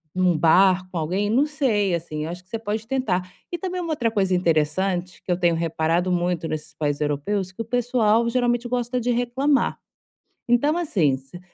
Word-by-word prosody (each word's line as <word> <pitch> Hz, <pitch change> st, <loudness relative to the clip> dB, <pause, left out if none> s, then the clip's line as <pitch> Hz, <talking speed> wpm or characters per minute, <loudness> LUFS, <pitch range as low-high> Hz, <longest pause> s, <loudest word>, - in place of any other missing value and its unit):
num 180 Hz, -2 st, +3 dB
bar 185 Hz, +3 st, +4 dB
com 175 Hz, -, -4 dB
alguém, 185 Hz, +6 st, -1 dB
não 265 Hz, +6 st, +3 dB
sei, 235 Hz, -, 0 dB
assim. 155 Hz, -2 st, -4 dB
Acho 175 Hz, +2 st, -6 dB
que 185 Hz, -, -33 dB
você 225 Hz, -, -4 dB
pode 220 Hz, 0 st, -3 dB
tentar. 185 Hz, -9 st, -1 dB, 0.2 s
E 345 Hz, -, -2 dB
também 365 Hz, +1 st, -4 dB
uma 335 Hz, -2 st, -3 dB
outra 235 Hz, -7 st, 0 dB
coisa 190 Hz, -3 st, +1 dB
interessante 180 Hz, +2 st, 0 dB
que 180 Hz, -, -3 dB
eu 175 Hz, -, +2 dB
tenho 170 Hz, -2 st, +3 dB
reparado 165 Hz, +2 st, 0 dB
muito 175 Hz, -2 st, 0 dB
nesses 155 Hz, -1 st, -5 dB
países 145 Hz, -2 st, -2 dB
europeus 180 Hz, +7 st, -1 dB
que 230 Hz, -, -6 dB
o -, -, -4 dB
pessoal 235 Hz, -2 st, +2 dB
geralmente 240 Hz, 0 st, +1 dB
gosta 245 Hz, 0 st, -1 dB
de 245 Hz, +1 st, 0 dB
reclamar. 255 Hz, +4 st, +1 dB, 0.7 s
Então, 285 Hz, +7 st, +3 dB
assim, 170 Hz, -, +1 dB
se 135 Hz, +7 st, -13 dB
195 Hz, 185 wpm, -23 LUFS, 170-240 Hz, 0.7 s, bar